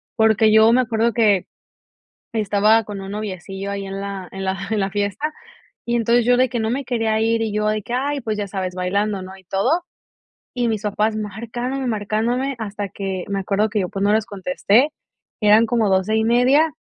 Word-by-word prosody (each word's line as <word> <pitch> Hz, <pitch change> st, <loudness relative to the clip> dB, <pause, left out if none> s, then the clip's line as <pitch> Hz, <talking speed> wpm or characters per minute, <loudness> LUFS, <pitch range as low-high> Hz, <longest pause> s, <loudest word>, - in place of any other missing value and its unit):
porque 220 Hz, -1 st, +4 dB
yo 220 Hz, +1 st, +7 dB
me 255 Hz, -, +4 dB
acuerdo 230 Hz, -1 st, +1 dB
que, 205 Hz, -5 st, +3 dB, 0.9 s
estaba 215 Hz, +1 st, +3 dB
con 205 Hz, -1 st, -7 dB
un 195 Hz, 0 st, -7 dB
noviecillo 195 Hz, -1 st, -5 dB
ahí 200 Hz, -1 st, -4 dB
en 195 Hz, 0 st, -5 dB
la 200 Hz, -2 st, -5 dB
en 195 Hz, 0 st, -6 dB
la 190 Hz, 0 st, -1 dB
en 215 Hz, -, +1 dB
la 195 Hz, 0 st, 0 dB
fiesta, 205 Hz, +9 st, -2 dB, 0.5 s
y 235 Hz, -, 0 dB
entonces 235 Hz, 0 st, +2 dB
yo 245 Hz, +1 st, +5 dB
de 255 Hz, -1 st, +3 dB
que 240 Hz, -, -2 dB
no 220 Hz, -, -1 dB
me 275 Hz, +3 st, -2 dB
quería 225 Hz, -3 st, 0 dB
ir, 230 Hz, 0 st, +1 dB
y 220 Hz, -2 st, -2 dB
yo 210 Hz, 0 st, 0 dB
de 215 Hz, 0 st, 0 dB
que, 235 Hz, -, -6 dB
ay 280 Hz, +3 st, -1 dB
pues 215 Hz, -1 st, -3 dB
ya 205 Hz, -1 st, -3 dB
sabes 185 Hz, -2 st, -4 dB
bailando, 195 Hz, +2 st, -1 dB
¿no? 190 Hz, +1 st, -9 dB
y 190 Hz, -, -18 dB
todo, 250 Hz, -, +1 dB, 0.7 s
y 245 Hz, -1 st, 0 dB
mis 215 Hz, -2 st, -1 dB
papás 215 Hz, +1 st, 0 dB
marcándome 235 Hz, +5 st, -4 dB
y -, -, -2 dB
marcándome 230 Hz, +5 st, -1 dB
hasta 205 Hz, -2 st, -4 dB
que 190 Hz, -2 st, -4 dB
me 200 Hz, -1 st, -1 dB
acuerdo 205 Hz, +3 st, 0 dB
que 210 Hz, 0 st, 0 dB
yo 185 Hz, -, -1 dB
pues 195 Hz, 0 st, -4 dB
no 205 Hz, -, +3 dB
les 220 Hz, -1 st, +1 dB
contesté, 220 Hz, +5 st, +1 dB, 0.5 s
eran 215 Hz, +1 st, +6 dB
como 225 Hz, -2 st, +1 dB
12 190 Hz, +3 st, +2 dB
y 220 Hz, -, +2 dB
media, 255 Hz, +7 st, +4 dB
215 Hz, 210 wpm, -21 LUFS, 200-235 Hz, 0.9 s, yo